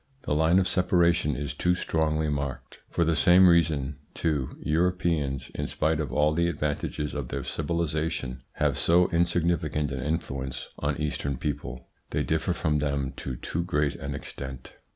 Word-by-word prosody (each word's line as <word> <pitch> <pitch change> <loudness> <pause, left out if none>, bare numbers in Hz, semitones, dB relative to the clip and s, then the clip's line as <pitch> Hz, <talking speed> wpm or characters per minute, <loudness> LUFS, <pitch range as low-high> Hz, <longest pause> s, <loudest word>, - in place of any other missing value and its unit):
The - - -1
line 80 +4 +4
of 95 -1 +3
separation 85 -5 +3
is 70 +1 -3
too 90 +4 +1
strongly 80 -2 0
marked. 70 -3 -4
For 85 - +1
the 80 0 +2
same 90 +4 +6
reason 75 -5 +3 0.2
too 75 -6 -1
Europeans, 80 -5 0
in - - -3
spite 80 0 0
of 75 -6 -2
all 75 +4 +3
the 85 +2 +2
advantages 75 -1 -2
of 70 -4 -3
their - - -4
civilisation, 80 -5 -2
have - - 0
so 90 +2 +4
insignificant 85 -3 +1
an 65 -1 -3
influence 65 -4 -3
on 75 0 -1
Eastern 70 -3 -2
people; 60 -4 -4 0.2
they - - 0
differ - - 0
from 75 -1 0
them 70 -2 -1
to 65 - -4
too 80 +7 -3
great 75 -5 +1
an 70 +1 -5
extent. 65 -2 -7
75 Hz, 160 wpm, -27 LUFS, 70-85 Hz, 0.2 s, same